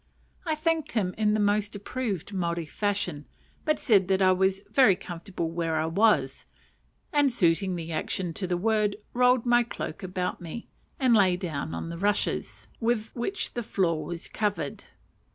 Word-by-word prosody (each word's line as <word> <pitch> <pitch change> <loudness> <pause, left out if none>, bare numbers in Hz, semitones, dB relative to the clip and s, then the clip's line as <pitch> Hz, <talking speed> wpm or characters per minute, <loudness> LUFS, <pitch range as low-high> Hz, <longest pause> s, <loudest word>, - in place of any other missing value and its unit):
I 315 - +1
thanked 325 0 -1
him 190 -5 0
in 215 -1 +2
the - - +1
most 205 +1 +1
approved 205 - -4
Maori 170 -3 -1
fashion, 180 -4 -2 0.4
but 305 - +2
said 195 -7 +3
I 185 -1 +5
was 190 +1 +2
"very 210 0 +4
comfortable 175 -2 -5
where 165 -1 -1
I 155 0 +1
was;" 165 -6 +2 0.7
and, 290 -2 +4
suiting 185 -3 +2
the 165 -1 -5
action 170 +2 -2
to 185 +3 -3
the 175 0 0
word, 210 +1 +1 0.2
rolled 250 0 +4
my 240 0 +5
cloak 235 - -5
about 185 -1 -3
me, 175 +7 -7 0.3
and 255 -3 +4
lay 190 -5 +4
down 160 -5 -4
on - - -5
the 170 0 -6
rushes, 205 +2 -1
with 225 -2 0
which 365 +11 -3
the 240 - -2
floor 180 -8 0
was 170 -1 -6
covered. 210 -2 -2
200 Hz, 165 wpm, -27 LUFS, 175-225 Hz, 0.7 s, I